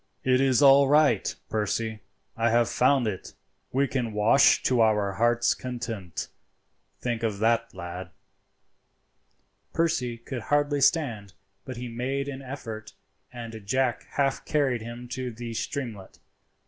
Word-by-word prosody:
"It 130 0 +3
is 135 +1 +3
all 140 0 +7
right, 145 -7 +3 0.2
Percy, 110 +1 -2 0.4
I 115 +1 +2
have 115 0 +2
found 130 0 +3
it. 105 -4 -5 0.4
We 140 +2 +2
can 125 -5 -2
wash 105 +6 +5
to 125 -2 +3
our 105 -3 +3
hearts' 120 +3 +2
content; 115 -8 -5 0.7
think 120 -2 -2
of 110 -3 -1
that, 115 +2 +1
lad." 90 0 -7 1.6
Percy 155 -8 0
could 120 +1 -6
hardly 145 +2 +1
stand, 115 - +1 0.3
but 130 -2 -7
he 125 +1 -5
made 130 +4 -3
an 140 -1 -6
effort, 115 -5 -7 0.4
and 115 -2 -8
Jack 130 +1 0
half 135 -1 0
carried 135 -6 0
him 120 +2 -8
to 125 0 -4
the 115 0 -7
streamlet. 115 -5 -5
120 Hz, 135 wpm, -27 LUFS, 110-135 Hz, 1.6 s, all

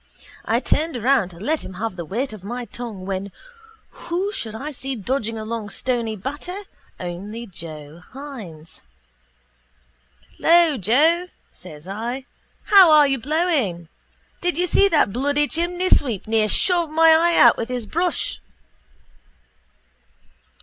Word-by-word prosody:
I 230 +2 +2
turned 305 +2 0
around 245 -4 +2
to 170 -2 -14
let 305 - -1
him 185 - -9
have 215 +1 -4
the 170 -2 -6
weight 230 - -3
of 205 -4 -11
my 240 +4 -5
tongue 220 -4 -8
when 195 +1 -4 0.6
who 365 +4 -3
should 220 - -5
I 285 +7 -5
see 270 -1 -5
dodging 225 0 -2
along 220 -1 -5
Stony 235 -1 -2
Batter 290 - -5 0.4
only 200 +6 -6
Joe 160 -4 -9
Hynes. 220 - -10 1.6
—Lo, 335 -3 +5
Joe, 310 - +3 0.2
says 160 -2 -13
I. 235 +7 -4 0.4
How 390 -4 +7
are 300 -1 +7
you 270 -2 0
blowing? 270 - -1 0.5
Did 355 -3 -1
you 355 - +2
see 400 +3 +4
that 300 - +2
bloody 285 +4 +1
chimneysweep 340 - 0
near 220 -1 +2
shove 345 - +1
my 325 +1 +5
eye 340 +1 +3
out 240 - +7
with 230 - -4
his 250 -3 -3
brush? 340 - -1
245 Hz, 135 wpm, -22 LUFS, 205-315 Hz, 1.6 s, How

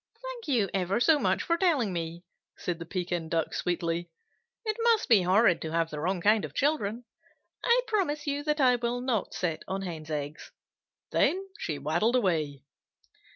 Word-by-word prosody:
"Thank - - -7
you 240 -8 +2
ever 190 +2 0
so 305 +4 +5
much - - +1
for 335 -1 +1
telling 295 - +2
me," 170 0 -4 0.3
said 175 -2 -3
the 170 - -7
Pekin 175 -2 -3
Duck, 165 -1 0
sweetly. 170 -1 -1 0.6
"It 430 -1 0
must 460 -2 +3
be 225 -7 +6
horrid 185 +1 +4
to 160 - -4
have 165 -1 +1
the 150 - -5
wrong 180 +3 -1
kind 210 +3 +4
of - - -6
children. 245 -6 0 0.6
I 485 +1 +4
promise 320 -10 0
you 285 0 -1
that 300 0 0
I 250 -3 +5
will 240 +1 -1
not 245 -6 -1
sit 165 -4 -2
on 195 +1 -3
Hens' 160 -4 -6
eggs." 150 0 -5 0.6
Then 385 +2 +2
she 155 - -3
waddled 170 - +1
away. 155 - 0
195 Hz, 175 wpm, -28 LUFS, -, 0.6 s, be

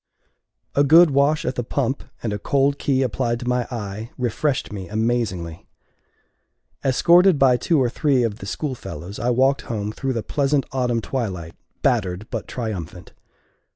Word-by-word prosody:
A 140 - +4
good 160 +3 +7
wash 140 +3 +2
at - - 0
the 120 - -3
pump, 130 +2 -2 0.2
and 110 -3 -1
a 105 - -3
cold 140 +4 +1
key 135 -1 +1
applied 120 -1 -1
to 120 - -5
my 125 -1 0
eye, 110 -1 -5
refreshed 125 +1 -1
me 95 -3 -6
amazingly. 105 -7 -2 1.2
Escorted 170 +6 +5
by 135 -2 +5
two 160 +5 +1
or 130 - +3
three 130 +1 +1
of 110 -2 -2
the 100 - -8
schoolfellows, 100 - -5
I 120 - 0
walked 130 +3 +3
home 105 -2 -2
through 135 +4 -3
the 115 -3 -3
pleasant 140 -1 0
autumn 125 -3 0
twilight, 95 -10 -4 0.3
battered 90 +3 0
but 115 -3 -4
triumphant. 90 -7 -6
120 Hz, 155 wpm, -22 LUFS, 105-135 Hz, 1.2 s, good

